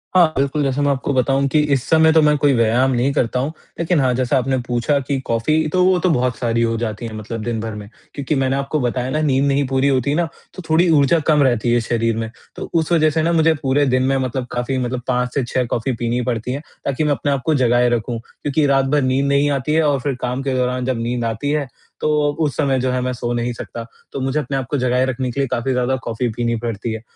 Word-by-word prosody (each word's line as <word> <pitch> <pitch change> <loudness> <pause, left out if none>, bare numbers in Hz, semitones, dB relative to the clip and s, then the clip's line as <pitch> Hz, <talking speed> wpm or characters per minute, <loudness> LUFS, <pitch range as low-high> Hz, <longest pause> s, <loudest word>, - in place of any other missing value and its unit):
हाँ, 170 -4 +5
बिल्कुल, 140 +2 0
जैसे 135 +1 0
मैं 145 - +2
आपको 140 +1 -1
बताऊँ 135 +2 +2
कि 155 - +2
इस 130 -3 +1
समय 160 0 +5
तो 160 - +5
मैं 150 -1 +4
कोई 145 0 +3
व्यायाम 120 +3 +2
नहीं 125 +3 +1
करता 125 -3 0
हूँ, 140 +4 -1 0.3
लेकिन 170 -1 +1
हाँ, 130 -2 +2
जैसा 130 +2 +1
आपने 130 +1 0
पूछा 125 +4 +1
कि 140 0 -2
कॉफ़ी, 155 +8 +1
तो 185 0 +3
वो 185 0 +4
तो 185 - +1
बहुत 125 -5 +1
सारी 115 -1 0
हो 115 0 +1
जाती 110 -1 -4
हैं, 115 - -6
मतलब 110 +1 -6
दिन 120 -2 -2
भर 110 -1 -5
में। 105 -1 -8 0.3
क्योंकि 140 +2 -2
मैंने 135 -1 +1
आपको 140 +2 -1
बताया 125 0 -1
ना, 155 +3 -1
नींद 140 -2 +2
नहीं 140 0 +1
पूरी 135 +1 +1
होती 135 +1 +1
ना, 175 +1 +1 0.3
तो 185 - -8
थोड़ी 170 +3 +4
ऊर्जा 140 +4 +3
कम 150 -2 +4
रहती 120 -2 +1
है 120 - +3
शरीर 115 -1 0
में, 115 -1 -3 0.3
तो - - -7
उस 165 0 0
वजह 155 -2 +4
से 160 +1 0
ना, 165 +2 +1
मुझे 165 0 +4
पूरे 140 +1 +2
दिन 130 -1 +2
में 135 +1 +1
मतलब 130 -1 -2
काफ़ी 125 +2 -2
मतलब 125 0 -2
5 125 -1 0
से 140 - 0
6 125 +1 -1
कॉफ़ी 120 +2 -1
पीनी 120 0 -1
ही 125 - 0
पड़ती 120 -1 -2
हैं, 140 +3 -3 0.2
ताकि 140 +2 -1
मैं 150 - +1
अपने 140 +2 -1
आपको 140 +3 0
जगाए 120 0 +3
रखूँ, 120 0 -2
क्योंकि 145 +5 -2
रात 135 -1 +3
भर 145 +2 +1
नींद 130 +1 +1
नहीं 140 +1 +2
आती 140 +2 -1
है 160 +1 +3
और 140 -2 +1
फिर 140 0 -2
काम 125 +2 -2
के 135 - -1
दौरान 125 0 -1
जब 130 -3 -1
नींद 120 0 -2
आती 115 +5 -2
है, 150 -2 -1 0.3
तो - - +1 0.3
उस 145 - -1
समय 135 -3 +1
जो 130 0 0
है, 125 - 0
मैं 125 0 -1
सो 120 -1 -4
नहीं 120 +1 -1
सकता। 115 0 -7 0.3
तो - - -5
मुझे 135 +3 0
अपने 140 -2 -3
आप 135 - -2
को 145 - 0
जगाए 125 0 +1
रखने 130 0 -2
के 140 - -5
लिए 135 - +1
काफ़ी 120 +3 -1
ज़्यादा 125 +1 +1
कॉफ़ी 115 +2 -2
पीनी 120 -1 0
पड़ती 115 0 -3
है 110 - -6
130 Hz, 265 wpm, -19 LUFS, 120-145 Hz, 0.3 s, हाँ